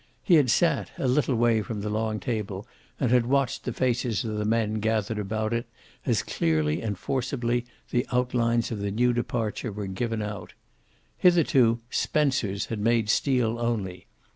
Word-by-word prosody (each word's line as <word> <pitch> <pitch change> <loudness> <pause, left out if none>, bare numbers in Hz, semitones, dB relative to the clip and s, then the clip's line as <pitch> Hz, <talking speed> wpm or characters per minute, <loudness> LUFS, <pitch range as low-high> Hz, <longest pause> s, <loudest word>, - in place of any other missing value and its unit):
He 185 - +3
had 145 -6 +5
sat, 170 +7 +2
a 135 - -1
little 130 0 +2
way 115 -1 +3
from 105 -2 -5
the 105 - -3
long 110 0 -1
table, 105 -4 -3 0.3
and 125 -4 +1
had 125 -2 +4
watched 135 -1 0
the 125 - -1
faces 120 -1 0
of 110 -1 -3
the 105 0 -1
men 110 -1 +1
gathered 110 0 0
about 110 +2 -2
it 115 0 -2 0.4
as - - +2
clearly 80 -2 0
and 105 -4 -3
forcibly 120 0 -1 0.2
the 125 +2 +1
outlines 120 -2 +1
of 110 - -3
the 100 0 -2
new 120 +4 +2
departure 115 -1 -2
were 105 0 -5
given 110 +3 -2
out. 105 -1 -6 0.7
Hitherto 140 -10 +4
"Spencer's" 125 -10 0
had 110 - -4
made 110 0 +2
steel 120 -4 +1
only. 100 -7 -2
115 Hz, 165 wpm, -26 LUFS, 105-125 Hz, 0.7 s, had